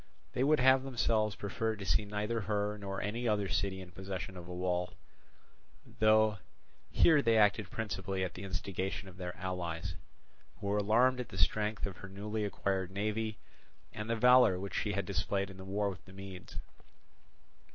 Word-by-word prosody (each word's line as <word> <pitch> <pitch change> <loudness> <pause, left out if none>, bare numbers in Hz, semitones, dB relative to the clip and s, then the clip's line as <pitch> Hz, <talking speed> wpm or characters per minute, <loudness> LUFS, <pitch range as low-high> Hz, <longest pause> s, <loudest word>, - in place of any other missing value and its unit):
They 125 - +1
would 150 +2 +4
have 130 +1 +6
themselves 115 -5 +1
preferred 110 +2 -2
to 100 - -6
see 95 +4 +2
neither 105 +3 -2
her 105 +1 -1
nor 100 -2 -4
any 115 +4 -2
other 105 -2 +1
city 95 0 -1
in 90 -1 -11
possession 95 +1 -5
of 90 -1 -9
a - - -7
wall; 90 0 -1 1.0
though 110 -1 +4 0.5
here 155 -3 +5
they 115 -3 +3
acted 105 -2 +3
principally 95 -4 -3
at 90 -2 -3
the 90 - -8
instigation 95 +1 -3
of 95 -1 -12
their 90 -1 -5
allies, 90 -2 -3 0.7
who - - -7
were 100 +1 +1
alarmed 120 +5 +4
at 125 - -4
the 95 - -8
strength 105 +6 +1
of 95 -3 -6
her 100 - -9
newly 105 +2 -3
acquired 95 -2 -1
navy 105 +2 -2 0.6
and 105 +1 -5
the 115 - +2
valour 125 -5 +6
which 100 +1 -5
she 105 - -1
had 100 0 -1
displayed 100 0 -1
in 95 - -12
the 95 - -9
war 100 +1 0
with 90 -2 -11
the 95 - -14
Medes. 95 -1 -9
100 Hz, 180 wpm, -33 LUFS, 95-110 Hz, 1.0 s, have